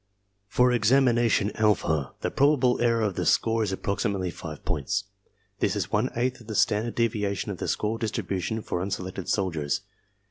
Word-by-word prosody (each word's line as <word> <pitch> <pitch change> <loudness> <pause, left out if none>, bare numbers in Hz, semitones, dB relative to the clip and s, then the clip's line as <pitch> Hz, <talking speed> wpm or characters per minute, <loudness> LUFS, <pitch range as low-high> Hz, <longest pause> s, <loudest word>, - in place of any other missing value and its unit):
For 125 +5 +3
examination 120 -3 +3
alpha 80 - +1
the - - -1
probable 135 -4 +3
error 115 -1 +2
of 105 -3 0
the - - -2
score 115 0 +2
is 105 -3 0
approximately 100 -1 -1
5 80 -3 -9
points. 100 0 -1 0.6
This - - +1
is - - -2
one 110 +5 +1
eighth 125 +1 -1
of 115 - -15
the 110 - -5
standard 110 +3 +1
deviation 105 -4 0
of 95 - -7
the - - -3
score 110 +2 -1
distribution 110 -1 -2
for 90 - -2
unselected 95 -1 -4
soldiers. 80 -8 0
105 Hz, 165 wpm, -26 LUFS, 95-115 Hz, 0.6 s, For